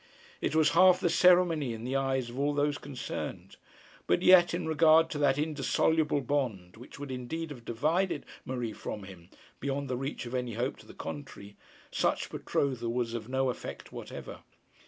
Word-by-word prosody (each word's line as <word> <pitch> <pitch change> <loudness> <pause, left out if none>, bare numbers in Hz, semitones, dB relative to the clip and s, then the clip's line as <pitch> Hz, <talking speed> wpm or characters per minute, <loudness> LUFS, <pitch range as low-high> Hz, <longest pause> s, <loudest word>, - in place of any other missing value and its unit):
It - - -1
was 155 -2 +4
half 180 +2 +6
the 175 - +1
ceremony 170 -7 +4
in 110 - -8
the 130 +2 -2
eyes 135 -3 0
of 125 - -7
all 145 +1 +1
those 145 0 +1
concerned; 135 -4 -6 0.5
but 90 - +2
yet, 180 -1 +7
in 175 +1 -2
regard 160 +1 +5
to 145 - -3
that 140 -2 +3
indissoluble 150 +1 +1
bond 120 -10 -2
which 120 +3 -12
would 140 -1 -6
indeed 150 +6 -4
have 125 -5 -9
divided 155 +8 0 0.2
Marie 125 -4 -3
from 105 -1 -6
him 95 -2 -12 0.3
beyond 140 0 -3
the 125 - -1
reach 135 0 -4
of 120 - -7
any 125 -2 -2
hope 125 +4 -2
to - - -16
the - - -13
contrary, 105 -8 -8 0.4
such - - 0
betrothal 125 -4 -1
was 120 -1 -1
of 115 0 -5
no 130 0 +1
effect - - -8
whatever. - - -8
135 Hz, 180 wpm, -30 LUFS, 120-155 Hz, 0.5 s, yet